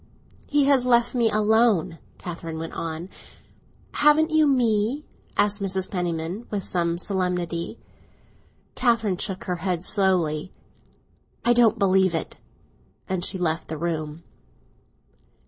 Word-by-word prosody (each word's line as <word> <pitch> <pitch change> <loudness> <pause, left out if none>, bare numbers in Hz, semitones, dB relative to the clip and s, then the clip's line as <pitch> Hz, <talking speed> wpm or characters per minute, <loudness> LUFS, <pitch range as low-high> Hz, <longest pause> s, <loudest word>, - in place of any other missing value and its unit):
"He 290 -1 +3
has 275 -3 +4
left 240 -1 +3
me 235 -3 +2
alone," 215 -6 +2 0.2
Catherine 165 -2 -6
went 165 0 -6
on. 165 +1 -5 0.8
"Haven't 305 +2 +4
you 315 -1 +4
me?" 245 +1 +1 0.3
asked 205 0 +2
Mrs. 190 -1 -1
Penniman, 175 +3 -3
with 200 -3 -3
much 170 -2 +1
expression. 180 -2 -2 1.0
Catherine 225 -6 +1
shook 190 -1 -3
her 180 -1 -3
head 180 -1 -2
slowly. 180 -5 +1 0.9
"I 240 - +5
don't 230 -2 +4
believe 190 -3 +3
it!" 160 - -4 0.7
and 185 -2 -2
she 190 - +1
left 165 -2 -1
the 160 - -5
room. 160 -1 -4
190 Hz, 120 wpm, -24 LUFS, 170-230 Hz, 1.0 s, I